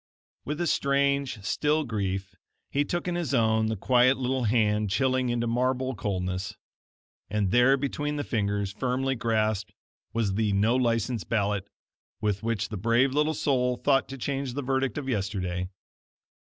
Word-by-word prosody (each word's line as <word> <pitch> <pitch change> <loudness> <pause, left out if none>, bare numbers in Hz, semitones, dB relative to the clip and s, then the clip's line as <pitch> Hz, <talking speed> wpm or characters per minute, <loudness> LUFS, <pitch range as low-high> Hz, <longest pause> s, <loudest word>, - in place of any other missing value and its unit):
With 150 +2 -3
a 175 - 0
strange 140 - +1
still 150 +8 +1
grief 95 -5 -3 0.4
he 145 - +2
took 175 +4 -3
in 175 - 0
his 170 -6 -1
own 110 -1 +3
the 110 - -1
quiet 125 +5 +4
little 130 -1 -1
hand 105 -2 +2
chilling 130 +5 +1
into 120 0 0
marble 130 +2 0
coldness, 95 -3 -3 0.7
and 100 -2 0
there 125 +3 +5
between 145 +2 -2
the 145 - -2
fingers, 100 -5 -1
firmly 130 +4 -1
clasped, 110 -3 0 0.4
was 110 -3 0
the 105 0 +1
No 105 +5 +3
License 115 -2 0
ballot 100 -3 -1 0.5
with 105 -2 -1
which 110 -2 -1
the 105 - -4
brave 115 +6 +2
little 150 +2 +1
soul 125 -3 +1
thought 135 -1 +2
to 135 - -6
change 135 0 -3
the 145 - -2
verdict 135 -2 0
of 145 -2 -4
yesterday. 95 -5 -2
120 Hz, 155 wpm, -27 LUFS, 105-135 Hz, 0.7 s, there